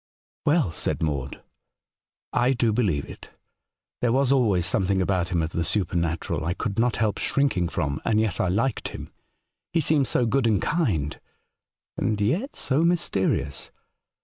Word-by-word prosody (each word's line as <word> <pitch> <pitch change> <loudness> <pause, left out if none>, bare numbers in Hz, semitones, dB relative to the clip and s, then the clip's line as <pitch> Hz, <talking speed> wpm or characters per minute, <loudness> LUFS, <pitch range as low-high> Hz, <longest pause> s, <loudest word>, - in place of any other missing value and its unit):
' - - -74
Well,' 145 - +3
said 85 - -2
Maude, 70 -4 -3 0.5
* - - -60
I 135 - +4
do 120 -3 +1
believe 95 - +1
it* - - -11 0.7
There 120 - +2
was 135 +1 +2
always 105 -10 +3
something 95 +1 +1
about 90 -1 0
him 85 -2 0
of 80 - -3
the 85 - -1
supernatural 85 -4 -1
I 85 +3 -1
could 100 0 -3
not 120 -1 +2
help 110 -2 0
shrinking 130 -12 +1
from, 70 -3 -2
and 110 -2 +2
yet 110 -5 0
I - - +1
liked 110 +7 0
him. - - -8 0.6
He 170 - +3
seemed 150 -3 +2
so 125 - +2
good 120 +2 +2
and 105 -4 +3
kind, 95 - -1 0.8
and 105 -1 0
yet 170 - 0
so 145 +4 +1
mysterious. 95 - 0
105 Hz, 165 wpm, -25 LUFS, 85-130 Hz, 0.8 s, I